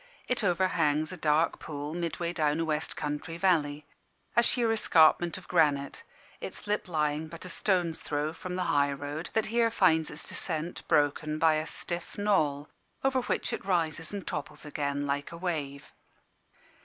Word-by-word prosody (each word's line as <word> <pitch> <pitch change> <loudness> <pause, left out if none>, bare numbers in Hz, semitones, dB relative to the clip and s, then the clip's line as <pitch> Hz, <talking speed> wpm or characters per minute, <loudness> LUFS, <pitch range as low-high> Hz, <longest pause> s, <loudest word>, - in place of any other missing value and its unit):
It 250 -2 0
overhangs 165 -4 +2
a - - -5
dark 155 0 +2
pool, 145 0 -5
midway 170 0 -2
down 155 -2 +1
a 165 - +1
west 155 -1 -1
country 150 +3 -3
valley 155 -5 +1 0.5
a 235 - +7
sheer 235 -1 +2
escarpment 175 -5 +4
of 190 - -12
granite, 145 -5 +2 0.4
its - - -7
lip 210 -1 -1
lying 155 -2 0
but 165 +3 -9
a - - -5
stone's 175 -3 0
throw 150 +1 -2
from 180 +2 -6
the 185 - 0
high 140 -1 +3
road, 145 +4 -5
that 220 - +2
here 235 -1 +4
finds 160 -8 +3
its 150 - -7
descent 165 0 -3
broken 150 +1 +2
by 160 0 +4
a 155 +1 -1
stiff 175 0 -5
knoll, 155 -9 +1 0.4
over 265 -1 +2
which - - -1
it - - -4
rises 165 -4 0
and 200 -2 -5
topples 150 0 -5
again 145 -1 -2
like 145 +2 -2
a 170 - -7
wave. 150 -6 -4
160 Hz, 165 wpm, -29 LUFS, 150-180 Hz, 0.5 s, a